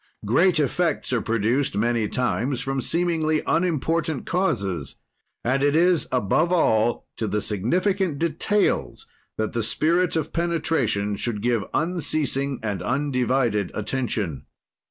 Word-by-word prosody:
"Great 165 - +3
effects 155 0 0
are 120 - +1
produced, 115 +5 0
many 115 0 +1
times, 125 +1 -1
from 135 +1 -2
seemingly 160 0 0
unimportant 165 -3 0
causes, 100 - -1 0.5
and 130 +3 +1
it 145 +1 +2
is, 175 0 +3
above 130 - +1
all, 120 -9 +2
to 110 - -2
the 105 - 0
significant 175 - 0
details 170 +6 0 0.3
that 110 0 -2
the 115 - 0
spirit 165 +11 +1
of 160 -1 -2
penetration 150 -12 0
should 110 +1 -2
give 115 -1 0
unceasing 150 -5 -1
and 105 -4 -2
undivided 125 -6 0
attention. 105 - -2
135 Hz, 120 wpm, -24 LUFS, 110-165 Hz, 0.5 s, Great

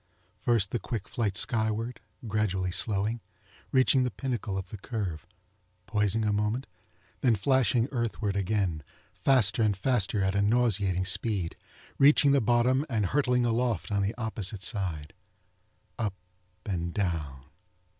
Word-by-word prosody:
First 115 -5 +1
the 120 - -1
quick 105 0 -5
flite 105 -4 -1
skyward, 110 +2 0 0.3
gradually 95 -4 0
slowing, 100 +6 0 0.5
reaching 130 0 +4
the 125 - +1
pinnacle 115 -3 -3
of 95 - -5
the 105 - -8
curve, 95 -8 -4 0.6
poising 105 0 +1
a 105 - +1
moment, 105 +5 -1 0.5
then 120 -4 +3
flashing 125 +2 +2
earthward 115 -5 -2
again, 95 -5 0 0.3
faster 120 -5 +3
and 105 -3 +2
faster 105 -4 +1
at 95 0 +1
a 100 - +1
nauseating 100 -4 +2
speed, 95 -2 0 0.4
reaching 140 0 +6
the 140 -1 +4
bottom 120 +4 +2
and 110 -5 0
hurtling 125 +2 +1
aloft 115 -4 0
on 100 -1 +1
the 100 +3 -1
opposite 105 -4 -3
side. 85 -8 -2 0.9
Up 105 -4 -1 0.5
and 85 -4 -3
down. 80 -9 -2
105 Hz, 135 wpm, -28 LUFS, 95-120 Hz, 0.9 s, reaching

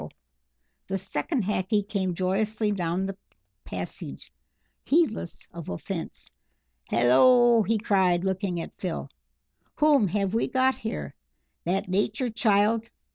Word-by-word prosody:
The 195 - -1
second 215 - -2
Hackee 200 +1 0
came 190 -4 -1
joyously 210 +4 0
down 180 -1 -1
the 195 0 -4 0.5
passage, - - -7 0.5
heedless 275 - 0
of 170 -2 -8
offence. 85 - -6 0.6
"Hallo," 235 - +5
he 220 +2 +1
cried, 190 -4 +2
looking 190 -2 -1
at 165 - -6
Phil, 180 -3 -4 0.6
"whom 295 -8 +4
have 195 +1 -1
we 230 - +1
got 260 0 +2
here? 75 - -5 0.5
That 185 +3 0
Nature 205 +6 0
child? 220 0 +2
200 Hz, 115 wpm, -26 LUFS, 185-225 Hz, 0.6 s, Hallo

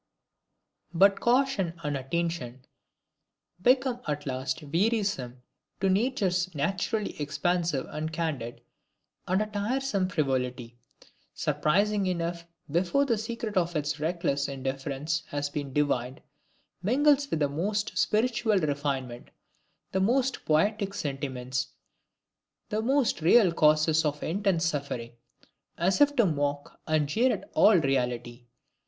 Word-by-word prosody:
But 195 +3 +5
caution 240 -9 +1
and 145 -1 -1
attention 135 -3 -3 1.0
become 255 +2 +3
at 145 -1 -2
last 130 +2 -3
wearisome 165 - -1 0.4
to 195 - +1
natures 190 - 0
naturally 195 +5 -2
expansive 165 0 0
and 155 +1 -4
candid, 155 -8 -3 0.7
and 190 +4 +2
a - - -4
tiresome 210 -1 -1
frivolity, 125 -6 -2 0.6
surprising 200 +5 +1
enough 170 -1 -3 0.2
before 185 - +2
the 240 -4 +2
secret 225 -1 -4
of 175 -2 +1
its 150 0 -1
reckless 155 -3 -1
indifference 135 +3 -3
has 145 0 -3
been 145 -2 -4
divined, 130 -3 -1 0.6
mingles 280 +7 +3
with 160 - -1
the 145 - +4
most 205 +8 -2
spiritual 225 -1 +2
refinement, 140 -6 -2 0.6
the 190 - 0
most 255 +6 +1
poetic 200 +6 +1
sentiments, 130 -5 -3 1.0
the 215 +1 -1
most 260 - +1
real 185 +3 +5
causes 155 0 +4
for 150 -2 -1
intense 185 -1 0
suffering, 140 -7 -3 0.7
as 185 - +1
if 290 0 +5
to 235 -5 +4
mock 145 -3 -2
and 155 -2 +2
jeer 235 - +2
at - - -4
all 210 -2 +6
reality. 125 -4 -1
165 Hz, 115 wpm, -28 LUFS, 140-210 Hz, 1.0 s, all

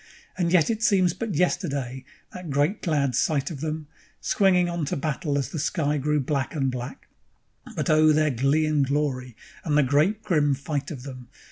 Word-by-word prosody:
And 175 -2 0
yet 180 +2 +4
it 220 -1 -3
seems 190 -6 +3
but 200 0 -4
yesterday, 140 -7 -1 0.3
that 180 -3 -8
great, 145 +8 0
glad 145 -6 0
sight 140 +4 0
of 140 -4 -7
them, 155 0 -3 0.3
Swinging 185 -3 +3
on 170 -2 -3
to - - -2
battle 150 0 -2
as 140 - -2
the 160 - -5
sky 150 -1 0
grew 150 +2 +1
black 140 +2 -2
and 135 -3 0
black; 125 +1 -7 0.7
But - - -2
oh 155 0 +5
their 155 0 +2
glee 135 +5 +2
and 155 -2 +2
glory, 135 -3 -2 0.3
and 150 -3 +1
the 150 - +5
great, 155 - +2
grim 150 -8 +2
fight 145 +2 -4
of 140 -7 -7
them! 130 -3 -9
150 Hz, 190 wpm, -25 LUFS, 140-170 Hz, 0.7 s, oh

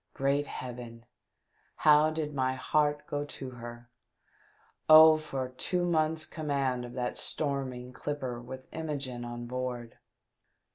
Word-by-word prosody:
Great 140 +2 +1
heaven! 120 -2 -7 0.7
how 150 0 +6
did 155 -1 -3
my 130 -1 0
heart 150 +3 +1
go 145 0 -2
to 135 -2 -7
her! 120 0 -10 1.0
Oh, 155 0 +10
for 135 -4 -4
two 175 +7 -1
months' 160 -2 +1
com 155 -1 -7
mand 130 -3 0
of 120 - -9
that 125 -1 -3
storming 130 -4 -3
clipper 130 -5 -4
with 130 +2 -9
Imogene 140 -6 -4
on 120 0 -6
board 125 -1 -4
130 Hz, 130 wpm, -30 LUFS, 125-150 Hz, 1.0 s, Oh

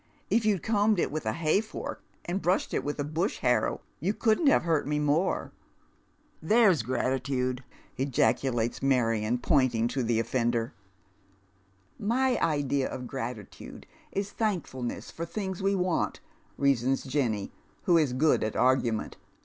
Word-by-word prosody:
" - - -36
If 225 -1 +3
you'd 200 -5 +1
combed 210 -1 +2
it 170 - 0
with 155 -6 -4
a 110 - +1
hay 165 +4 +2
fork 220 - -7 0.2
and 185 +3 -2
brushed 180 +2 +1
it - - 0
with 145 - -3
a - - +1
bush 160 +7 -1
harrow 125 -1 +1 0.2
you 195 +8 -1
couldn't 225 +7 +2
have 275 - +5
hurt 160 -5 +1
me 150 0 0
more." 150 +5 0 0.5
" - - -38
There's 215 - +5
gratitude! 130 +1 -1 0.2
" - - -30
ejaculates 125 -3 +1
Marion, 115 -4 +1
pointing 125 -4 +2
to 135 - -2
the 115 -1 +1
offender. 115 -1 0 0.7
" 95 0 -28
3Iy 250 +4 +1
idea 140 -3 +1
of 125 - -6
gratitude 120 -5 -7 0.3
is 200 0 -3
thankfulness 170 - -3
for 165 - -6
things 190 +2 -4
we 195 +1 +2
want," 180 -2 0 0.4
reasons 135 -1 +2
Jenny, 125 -7 -1 0.3
who 170 -2 +4
is 145 -5 +1
good 150 +5 +3
at 110 - -2
argument. 125 -4 +1
140 Hz, 155 wpm, -28 LUFS, 120-180 Hz, 0.7 s, have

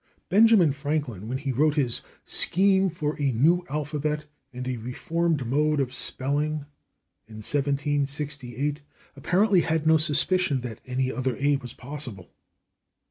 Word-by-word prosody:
Benjamin 205 -5 +6
Franklin, 140 -8 -3
when 130 +3 -2
he 135 0 -3
wrote 150 +4 +2
his 130 -6 0 0.2
"Scheme 190 +1 +3
for 155 -3 -3
a 140 -2 +2
New 165 +10 +3
Alphabet 150 +1 -2 0.3
and 125 0 -6
a 130 -1 -2
Reformed 150 +5 -1
Mode 150 +4 +1
of 130 -2 -1
Spelling," 145 +3 -2 0.6
in 110 - -12
1768, 145 -1 -1 0.3
apparently 185 +6 +3
had 160 -1 -1
no 160 0 +6
suspicion 155 -1 +2
that 120 -2 -7
any 130 +1 -1
other 130 0 -2
/a/ 140 +2 +1
was 125 -1 -8
possible. 125 - -7
145 Hz, 135 wpm, -26 LUFS, 130-155 Hz, 0.6 s, Benjamin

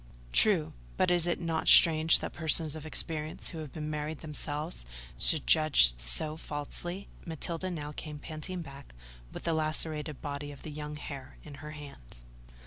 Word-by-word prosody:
"True: 75 +5 +3 0.2
but 180 - +3
is 175 -1 +2
it 175 - +1
not 165 -2 -1
strange 160 -1 +7
that - - -4
persons 160 -1 +2
of 155 0 -7
experience, 155 0 -3
who 165 - -6
have 155 -3 -6
been 155 -1 -4
married 150 0 -3
themselves, 150 - -3 0.4
should 155 -3 +4
judge 155 - +6
so - - -2
falsely?" 175 +6 -5 0.2
Matilda 165 +2 -3
now 150 -4 -4
came 150 0 -6
panting 160 +4 -5
back, 140 - -12 0.4
with - - -7
the 165 - +1
lacerated 155 -1 -2
body 145 0 -4
of 140 - -12
the 155 - -6
young 150 0 -5
hare 140 -2 -8
in 150 - -10
her 150 0 -7
hand. 140 - -11
155 Hz, 165 wpm, -31 LUFS, 145-160 Hz, 0.4 s, strange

